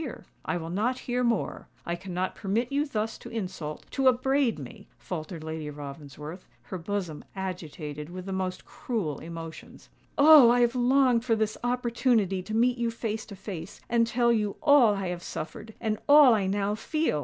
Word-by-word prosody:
"I 175 - -1
will 165 -1 -5
not 225 +7 0
hear 250 0 0
more;—I 230 -6 -2
cannot 185 0 -3
permit 225 +6 -1
you 290 +2 +1
thus 220 -4 -3
to - - -10
insult—to 190 - -3
upbraid 260 - +3
me," 135 -5 -10
faltered 155 +6 -6
Lady 160 -1 -5
Ravensworth, 150 +3 -9 0.2
her 185 - -6
bosom 180 -3 -4
agitated 160 -5 -5
with 185 +1 -7
the 195 - -4
most 185 -1 -3
cruel 195 - -3
emotions. 165 -1 -9 0.3
"Oh! 290 -4 +9
I 245 +1 +4
have 240 0 +3
longed 250 -1 +3
for 235 -2 +2
this 215 -1 0
opportunity 235 -5 +1
to 215 +4 -5
meet 245 +1 +3
you 235 -1 +1
face 225 -1 -4
to 200 - -9
face, 195 0 -7
and 235 -1 +3
tell 235 0 +3
you 210 -3 0
all 260 -8 +6
I 195 -2 -3
have 175 -1 -4
suffered, 215 +7 -7
and 215 -1 -1
all 290 -4 +9
I 200 -3 +1
now 200 +1 0
feel!" 265 - -1
210 Hz, 170 wpm, -28 LUFS, 175-240 Hz, 0.3 s, Oh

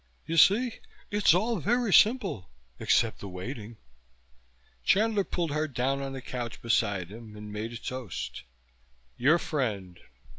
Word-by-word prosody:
You 165 - -3
see? 220 - +5 0.3
It's 205 -5 +4
all 220 +3 +1
very 235 +2 +1
simple, 195 - +4 0.3
except 115 -2 +2
the 100 - -7
waiting." 110 +4 -7 1.1
Chandler 210 0 +3
pulled 170 -4 -2
her 155 +1 0
down 135 0 -1
on 135 0 -4
the 130 -1 -7
couch 120 -3 -5
beside 100 -6 0
him 110 -1 -10
and 105 0 -8
made 110 +2 -4
a 120 - -6
toast. 125 -5 -5 0.7
"Your 145 +7 +4
friend." 105 - -3
130 Hz, 140 wpm, -28 LUFS, -, 1.1 s, see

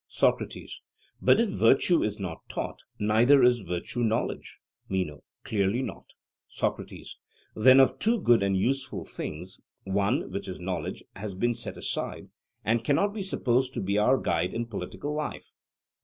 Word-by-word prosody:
SOCRATES: - - -1 0.4
But - - +5
if 230 -2 +2
virtue 135 +6 +4
is 105 -1 -1
not 90 -4 -6
taught, - - -4 0.2
neither 115 +6 +5
is 125 -1 +5
virtue 90 +4 -4
knowledge. 115 -1 -1 0.3
MENO: 90 -6 -2 0.2
Clearly 105 +4 0
not. - - -8 0.3
SOCRATES: - - -4 0.4
Then 130 +5 +7
of 135 - +4
two 230 +1 +2
good 120 - +4
and 100 -1 +1
useful 135 +7 -1
things, 90 +5 -6 0.2
one, 100 +6 0
which 100 0 -4
is 95 - -6
knowledge, 90 0 -4
has 100 -1 -5
been 120 +5 +1
set 120 - -6
aside, - - -4 0.4
and 115 +1 +2
cannot 175 - +2
be 215 - -4
supposed 130 -8 0
to - - -1
be 100 +2 0
our 125 +6 +4
guide 90 -6 -1
in 120 +1 -1
political 115 +7 -5
life. 150 0 -5
115 Hz, 155 wpm, -28 LUFS, 95-130 Hz, 0.4 s, Then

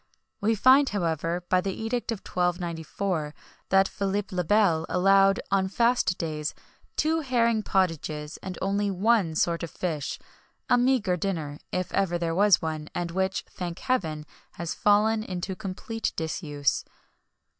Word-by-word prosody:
We 220 +2 +2
find, 260 +6 +6
however, 170 -2 -1
by 185 - +3
the 190 0 -3
Edict 230 +2 -2
of 220 - -4
1294, 175 -2 -2 0.3
that 195 0 +5
Philip 200 0 -2
le 180 -1 -1
Bel 175 -3 +3
allowed, 195 +2 +4
on 190 -1 +2
fast 235 -2 +2
days, 155 -2 -3 0.4
two 320 +1 +2
herring 235 -6 +2
pottages, 155 -6 -1
and 185 -1 -7
only 200 +1 +1
one 195 -3 +2
sort 170 +1 +1
of 170 - -4
fish 155 -5 -3 0.5
a - - +5
meagre 245 -7 +2
dinner, 160 -6 -3
if 180 -1 -2
ever 185 -3 +1
there 170 -1 -1
was 200 0 +4
one, 155 -1 -3
and 175 -1 -2
which, 190 +2 -1
thank 175 -1 -6
heaven, 160 - -1 0.3
has 170 -1 -4
fallen 215 +2 +3
into 185 -2 -4
complete 215 +3 -4
disuse. 150 -3 -1
185 Hz, 145 wpm, -27 LUFS, 165-205 Hz, 0.5 s, find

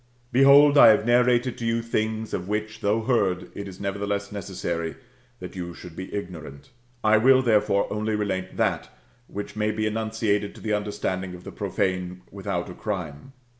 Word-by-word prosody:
^ - - -36 0.3
Behold, 140 +2 +7
I - - +10
have 110 -1 +5
narrated 120 +1 +3
to 120 - -4
you 115 0 0
things, 110 -1 -2
of 90 0 -3
which, 110 +1 -3
though 110 +2 +1
heard, 100 -7 0
it 100 - -6
is 95 -2 -10
nerertheless 100 0 -3
necessary 85 -4 -4 0.4
that 90 0 -8
you 85 -2 -6
should 90 -3 -11
be 95 - -7
ignorant. 85 - -7 0.3
I 110 0 +5
will, 130 +3 +5
therefore, 105 -4 +3
only 110 +1 -1
relate 95 -3 -3
that, - - 0 0.4
which 105 +1 -7
may 105 0 0
be 110 0 -1
enunciated 110 -1 -1
to - - -12
the 110 -1 -1
understanding 95 -3 -2
of 90 - -12
the - - -8
profane 90 -1 -2
without - - -3
a - - -8
crime. 90 - -5
105 Hz, 175 wpm, -25 LUFS, 95-110 Hz, 0.4 s, I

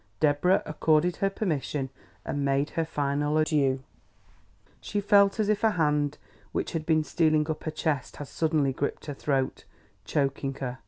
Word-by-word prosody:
Deborah 155 +5 +3
accorded 155 +3 +2
her 195 - +1
permission 150 -8 -2 0.3
and 145 - -2
made 140 +1 +1
her 165 - 0
final 145 0 0
adieux. 145 -4 +2 1.0
She 205 - -2
felt 200 0 +4
as 215 - +2
if 215 0 +1
a 220 - +6
hand 150 -2 +1 0.4
which - - -2
had 160 -2 -4
been 155 -1 +3
stealing 155 -1 +2
up 155 - -6
her - - 0
chest 155 -4 -2
had 145 - -7
suddenly 155 -4 +1
gripped 140 +2 -3
her 145 - -4
throat, 135 -1 -1 0.4
choking 135 -1 -1
her. 130 -2 -5
150 Hz, 160 wpm, -27 LUFS, 140-165 Hz, 1.0 s, a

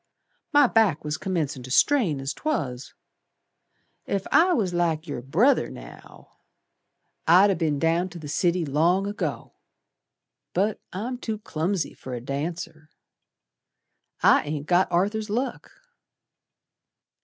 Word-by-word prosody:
My 290 -1 +6
back 220 - +2
was 150 0 -3
commencin' 155 -8 -2
to 125 - -10
strain, 190 - +3
as 135 +1 -3
'twas. 140 - -3 1.1
Ef 195 -1 -2
I 355 +3 +5
was 205 - 0
like 165 -2 0
yer 145 -6 -5
brother 185 - +2
now, - - -13 0.9
I'd 185 +5 +6
ha' - - -9
be'n 155 -4 0
down 165 +4 +1
to 175 - -10
the 155 -3 -8
city 170 +3 0
long 165 +7 +2
ago. 205 +1 -4 1.0
But 200 +4 +1
I'm 240 +7 -4
too 220 -3 -3
clumsy 180 -4 -2
fer 130 -1 -7
a - - -4
dancer. 155 +4 -5 1.3
I - - +6
ain't 145 -1 -4
got 175 +3 +2
Arthur's 210 +5 0
luck." 245 +6 -3
175 Hz, 125 wpm, -25 LUFS, 150-205 Hz, 1.3 s, My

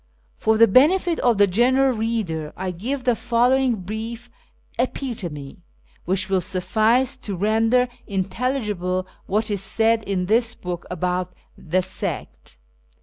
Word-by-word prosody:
For 220 0 +1
the 230 +1 +7
benefit 325 - +4
of 240 -3 +2
the 205 - +6
general 255 +6 +3
reader, 215 -9 -2
I 185 0 -3
give 245 +10 -4
the 245 -2 +2
following 245 +2 +2
brief 225 +5 -6 0.5
epitome, 185 - -4 0.5
which 190 +1 +1
will 190 -2 +1
suffice 220 +9 +1
to 205 -6 -5
render 225 +6 +2 0.2
intelligible 195 -2 -2 0.2
what 215 +2 0
is 200 -2 -1
said 225 +3 +1
in 190 -2 -1
this 230 +4 +2
book 175 -1 -6
about 180 +1 -2 0.2
the 180 +3 -1
sect. 65 - -5
220 Hz, 130 wpm, -22 LUFS, 185-245 Hz, 0.5 s, the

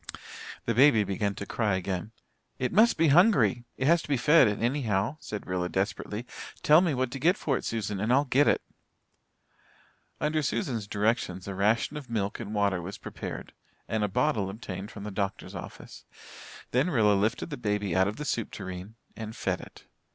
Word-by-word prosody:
The 115 - +1
baby 125 -3 +6
began 100 +1 -2
to 100 - -6
cry 105 -2 0
again. 95 +2 -3 0.5
"It 125 - -2
must 220 +5 +5
be 165 -1 +4
hungry 135 - +4
it 130 - -1
has 170 +3 +4
to - - -10
be 140 -2 +1
fed 150 +1 +6
anyhow," 115 +2 0
said 105 -7 -6
Rilla 90 -1 -2
desperately. 105 +4 -2 0.4
"Tell 155 +3 +7
me 170 -6 +1
what 130 -1 -1
to 135 - -5
get 175 +8 +3
for 140 - 0
it, - - -3
Susan, 105 -3 -2
and 110 +4 0
I'll 140 +3 +4
get 140 +2 +3
it." - - +2 1.6
Under 155 +1 +1
Susan's 125 - -2
directions 100 -3 -1
a 100 - -3
ration 110 +9 +1
of 140 -5 -9
milk 105 -3 -2
and 110 -2 -5
water 100 -3 +1
was 95 +4 -7
prepared, - - -7 0.3
and 110 -1 -1
a - - +2
bottle 105 -1 0
obtained 100 -1 -7
from 105 - -9
the 105 - -5
doctor's 100 0 -3
office. - - -10 0.7
Then 130 +8 +2
Rilla 110 -9 +4
lifted 110 +8 0
the 145 - -4
baby 105 -5 -1
out 95 +1 +4
of 105 - -3
the 150 - -6
soup 115 -6 -1
tureen 95 +2 -7 0.2
and 110 0 -7
fed - - -2
it. - - -14
110 Hz, 190 wpm, -28 LUFS, 100-135 Hz, 1.6 s, Tell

